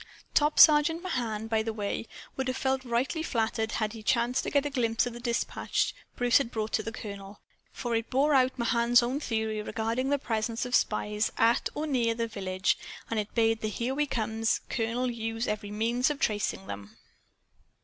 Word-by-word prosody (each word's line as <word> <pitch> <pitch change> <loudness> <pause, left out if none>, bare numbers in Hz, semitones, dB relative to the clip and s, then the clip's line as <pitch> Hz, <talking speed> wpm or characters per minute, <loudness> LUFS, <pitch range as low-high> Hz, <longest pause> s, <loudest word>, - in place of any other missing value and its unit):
Top 300 +1 +3
Sergeant 310 +3 +6
Mahan, 235 - -2
by 225 -1 +1
the 225 +1 -2
way, 210 +1 -3 0.3
would 265 -1 -2
have 255 - -1
felt 265 0 0
highly 250 +7 0
flattered 225 -5 -1
had 215 -1 -1
he 225 - -8
chanced 240 +2 +1
to - - -3
get 285 0 +2
a 290 - -2
glimpse 230 -3 +1
of 245 - -4
the 240 - -8
dispatch 235 -1 -1 0.2
Bruce 245 +1 +4
had 275 - -2
brought 220 -1 -3
to - - +2
the 225 - -5
colonel. 200 -3 -9 0.3
For 240 -2 -3
it 225 0 -2
bore 285 +4 +3
out 260 -1 +3
Mahan's 235 0 +3
own 255 +4 -1
theory 220 -5 -2
regarding 230 +5 -2
the 285 - +3
presence 225 -2 -2
of 250 - -6
spies 210 -1 +1
at 230 +1 +3
or 300 - -2
near 240 -6 +1
the 230 0 -1
village, 190 -3 -1 0.3
and 225 - +1
it 210 0 -5
bade 225 -1 +2
the 215 - -1
"Here 235 +5 -2
We 295 +2 0
Come" 225 -3 -2 0.3
colonel 240 +2 -1
use 225 0 -3
every 210 -1 -3
means 230 +4 +1
for 295 - +1
tracing 210 -6 -1
them. 100 - -8
230 Hz, 195 wpm, -29 LUFS, 220-255 Hz, 0.3 s, Sergeant